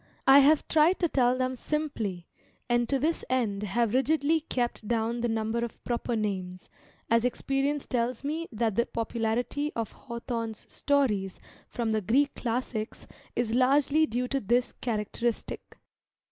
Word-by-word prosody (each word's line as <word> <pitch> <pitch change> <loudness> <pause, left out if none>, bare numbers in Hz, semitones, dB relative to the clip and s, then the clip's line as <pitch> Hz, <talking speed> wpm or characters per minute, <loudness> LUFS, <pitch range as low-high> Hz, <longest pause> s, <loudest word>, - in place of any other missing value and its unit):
I 270 +1 +9
have 290 +2 +4
tried 320 +4 +4
to 345 - +4
tell 255 -4 +2
them 255 0 -1
simply, 235 - -3 0.4
and 240 -1 +1
to 275 - +2
this 315 +5 0
end 225 -6 0
have 210 +2 0
rigidly 300 +4 +2
kept 240 -7 -3
down 230 +1 0
the 240 0 0
number 220 +1 -1
of 235 - -7
proper 240 0 -2
names, 185 -4 -3 0.4
as 230 0 +4
experience 275 +3 0
tells 245 +1 -1
me 315 +4 -2
that 225 -1 0
the 235 - +2
popularity 235 +5 -1
of 225 -3 -2
Hawthorne's 235 -3 -5
stories 215 -10 +1 0.3
from 230 -2 -2
the 215 0 +1
Greek 275 +8 +2
Classics 230 -2 -3 0.3
is 230 -2 0
largely 280 +5 +4
due 250 +1 -1
to 275 - 0
this 240 +3 +1
characteristic. 230 0 -3
240 Hz, 145 wpm, -28 LUFS, 225-275 Hz, 0.4 s, I